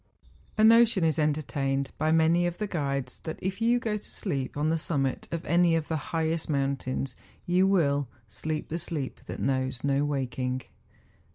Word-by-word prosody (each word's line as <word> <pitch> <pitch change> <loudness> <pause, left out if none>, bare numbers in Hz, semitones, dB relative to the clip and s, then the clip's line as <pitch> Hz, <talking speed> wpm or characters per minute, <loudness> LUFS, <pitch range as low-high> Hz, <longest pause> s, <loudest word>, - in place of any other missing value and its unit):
A 215 - +4
notion 230 -3 +6
is 160 -1 +2
entertained 140 -3 0
by 155 +1 +2
many 165 +2 +4
of 175 0 -4
the 210 - -1
guides 140 -8 -2
that 160 - -6
if 190 +3 -3
you 235 +2 +4
go 220 -3 -1
to 210 - -12
sleep 140 -9 -3
on 150 +2 +1
the 165 0 +1
summit 135 -5 -1
of 170 0 -3
any 170 -1 +4
of 160 -2 -2
the 160 - 0
highest 160 0 -1
mountains 135 -2 -1 0.3
you 180 +2 +3
will 145 -8 +2
' 115 - -36
Sleep 155 -1 -2
the 165 - -2
sleep 155 -5 -4
that - - -6
knows 130 -1 -1
no 140 0 +2
waking. 130 -3 -2
155 Hz, 180 wpm, -28 LUFS, 135-175 Hz, 0.3 s, notion